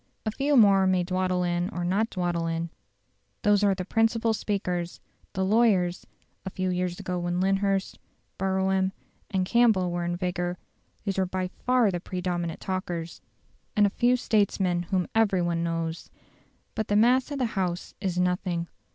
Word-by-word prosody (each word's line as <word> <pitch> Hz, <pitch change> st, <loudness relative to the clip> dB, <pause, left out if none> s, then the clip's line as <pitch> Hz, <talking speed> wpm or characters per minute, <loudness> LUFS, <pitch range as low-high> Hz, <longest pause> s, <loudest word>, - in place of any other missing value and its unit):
A 215 Hz, -, 0 dB
few 280 Hz, +5 st, +1 dB
more 195 Hz, -4 st, +6 dB
may 185 Hz, -1 st, +2 dB
dawdle 185 Hz, 0 st, 0 dB
in 175 Hz, +1 st, 0 dB
or 175 Hz, -5 st, -4 dB
not 205 Hz, +6 st, +1 dB
dawdle 175 Hz, -2 st, -1 dB
in: 165 Hz, 0 st, -2 dB, 0.7 s
those 205 Hz, -1 st, +4 dB
are 200 Hz, -1 st, +4 dB
the 185 Hz, -1 st, -5 dB
principal 225 Hz, +2 st, +2 dB
speakers, 180 Hz, -5 st, -2 dB, 0.3 s
the 190 Hz, 0 st, 0 dB
lawyers 195 Hz, -4 st, +2 dB, 0.4 s
(a 190 Hz, -, -4 dB
few 185 Hz, 0 st, -2 dB
years 180 Hz, -1 st, -2 dB
ago 180 Hz, -1 st, -3 dB
when 175 Hz, 0 st, -1 dB
Lyndhurst, 195 Hz, 0 st, 0 dB, 0.4 s
Brougham, 190 Hz, 0 st, +1 dB, 0.4 s
and 190 Hz, -2 st, 0 dB
Campbell 215 Hz, -5 st, +3 dB
were 175 Hz, 0 st, -2 dB
in 175 Hz, 0 st, -1 dB
vigour, 180 Hz, 0 st, -2 dB, 0.5 s
they 200 Hz, -, 0 dB
were 185 Hz, -, 0 dB
by 185 Hz, 0 st, -2 dB, 0.2 s
far 250 Hz, -5 st, +4 dB
the 175 Hz, -, -2 dB
predominant 175 Hz, -2 st, -3 dB
talkers) 175 Hz, -3 st, -4 dB, 0.5 s
and 210 Hz, -2 st, +5 dB
a 200 Hz, -, +1 dB
few 245 Hz, +4 st, +3 dB
statesmen 190 Hz, -7 st, +1 dB
whom 185 Hz, -3 st, +1 dB
every 200 Hz, -5 st, +3 dB
one 170 Hz, -1 st, 0 dB
knows. 165 Hz, -1 st, -3 dB, 0.6 s
But 220 Hz, -, -2 dB
the 205 Hz, -, +1 dB
mass 245 Hz, +5 st, +4 dB
of 285 Hz, -, -4 dB
the 255 Hz, -, +1 dB
House 180 Hz, -3 st, -2 dB
is 185 Hz, -3 st, -2 dB
nothing. 180 Hz, -1 st, 0 dB
185 Hz, 165 wpm, -27 LUFS, 175-205 Hz, 0.7 s, more